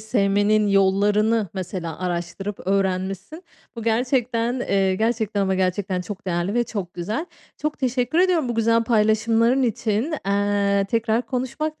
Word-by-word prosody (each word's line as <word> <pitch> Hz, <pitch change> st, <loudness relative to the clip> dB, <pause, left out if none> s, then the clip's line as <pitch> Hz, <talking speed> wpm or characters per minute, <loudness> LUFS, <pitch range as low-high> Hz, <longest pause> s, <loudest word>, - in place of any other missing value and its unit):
sevmenin 210 Hz, -1 st, +2 dB
yollarını 205 Hz, +2 st, +2 dB
mesela 180 Hz, -3 st, -5 dB
araştırıp 180 Hz, +3 st, -4 dB
öğrenmişsin. 195 Hz, -, -1 dB, 0.3 s
Bu 230 Hz, -, -5 dB
gerçekten, 240 Hz, +1 st, 0 dB
eee, 195 Hz, -5 st, +1 dB
gerçekten 220 Hz, -2 st, 0 dB
ama 190 Hz, -1 st, +1 dB
gerçekten 185 Hz, 0 st, -1 dB
çok 200 Hz, +2 st, -8 dB
değerli 175 Hz, +3 st, -1 dB
ve 240 Hz, 0 st, +2 dB
çok 200 Hz, -6 st, -5 dB
güzel. 210 Hz, -, -3 dB, 0.3 s
Çok 305 Hz, 0 st, -3 dB
teşekkür 255 Hz, +3 st, 0 dB
ediyorum 355 Hz, -7 st, +3 dB
bu 240 Hz, -, -2 dB
güzel 230 Hz, 0 st, +2 dB
paylaşımların 225 Hz, +3 st, +2 dB
için. 230 Hz, +4 st, 0 dB
Eee, 200 Hz, 0 st, +1 dB
tekrar 230 Hz, +1 st, 0 dB
konuşmak 270 Hz, +6 st, -3 dB
215 Hz, 130 wpm, -23 LUFS, 195-240 Hz, 0.3 s, ediyorum